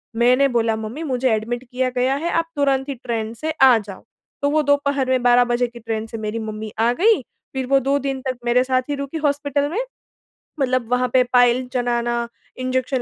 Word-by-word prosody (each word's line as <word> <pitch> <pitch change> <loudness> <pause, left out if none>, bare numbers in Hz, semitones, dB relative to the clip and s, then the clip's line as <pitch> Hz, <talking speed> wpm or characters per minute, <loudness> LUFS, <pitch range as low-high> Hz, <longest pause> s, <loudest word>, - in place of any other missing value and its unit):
मैंने 250 +4 +4
बोला, 230 -2 +1
"मम्मी 220 +8 -6
मुझे 260 -3 0
एडमिट 235 +3 -2
किया 255 +1 -2
गया 255 +2 +2
है 330 +5 -2
आप 330 0 0
तुरंत 275 -1 +1
ही 280 - -3
ट्रेन 230 -3 -4
से 310 +7 -3
आ 260 -3 +8
जाओ।" 205 -3 -8 0.4
तो 285 - +2
वो 305 +1 +2
दोपहर 285 -2 +1
में 255 -1 +1
12 245 0 +5
बजे 245 +1 +1
की 240 0 -12
ट्रेन 225 -1 -3
से 225 - -7
मेरी 215 +1 -3
मम्मी 215 -1 -6
आ 230 +1 +3
गईं। 430 -2 +4 0.3
फ़िर 265 -1 -2
वो 275 +1 +4
2 275 +2 +1
दिन 270 -1 -3
तक 255 -1 -2
मेरे 245 +1 +3
साथ 255 0 +1
ही 290 - 0
रुकीं 280 +3 -5
हॉस्पिटल 285 -1 0
में, 365 +8 -2 0.8
मतलब 255 -3 0
वहाँ 250 0 +2
पे 255 -1 +5
पाइल 245 +1 +4
चढ़ाना, 240 -1 0 0.3
इंजेक्शन 255 0 -1
255 Hz, 210 wpm, -21 LUFS, 235-275 Hz, 0.8 s, आ